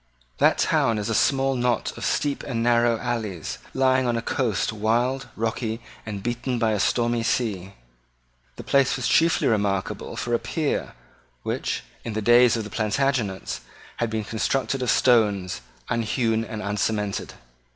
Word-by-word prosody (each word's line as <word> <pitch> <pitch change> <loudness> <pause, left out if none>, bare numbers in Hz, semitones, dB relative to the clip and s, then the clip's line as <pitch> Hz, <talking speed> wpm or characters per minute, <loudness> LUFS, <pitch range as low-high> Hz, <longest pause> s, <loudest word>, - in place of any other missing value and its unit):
That - - +4
town 115 -1 +2
is 105 +1 -2
a - - 0
small 135 +3 +2
knot 120 -2 0
of - - -8
steep 145 -1 0
and 115 -4 -2
narrow 120 -1 +3
alleys, 110 -9 -3
lying 130 -1 +2
on 120 -1 +1
a - - -1
coast 115 -5 0
wild, 120 +5 0
rocky, 115 0 -2 0.3
and 100 -2 -5
beaten 120 +1 -2
by 115 -2 +2
a 105 - 0
stormy 120 +3 +1
sea. 105 -5 -1 0.8
The - - -8
place 140 -1 +3
was 125 - -3
then - - +1
chiefly 165 +1 +4
remarkable 100 -3 -1
for 120 - -3
a 120 - +3
pier 155 -4 -2 0.5
which, - - -2 0.2
in 115 - -4
the 110 - -2
days 120 +1 +6
of 110 - -2
the 105 - -9
Plantagenets, 110 -3 -1 0.4
had 120 - 0
been 110 -1 -2
constructed 130 +5 -1
of 125 - 0
stones, 100 - +3 0.3
unhewn 115 0 0
and 110 -2 -6
uncemented. 105 0 -2
115 Hz, 160 wpm, -24 LUFS, 105-125 Hz, 0.8 s, days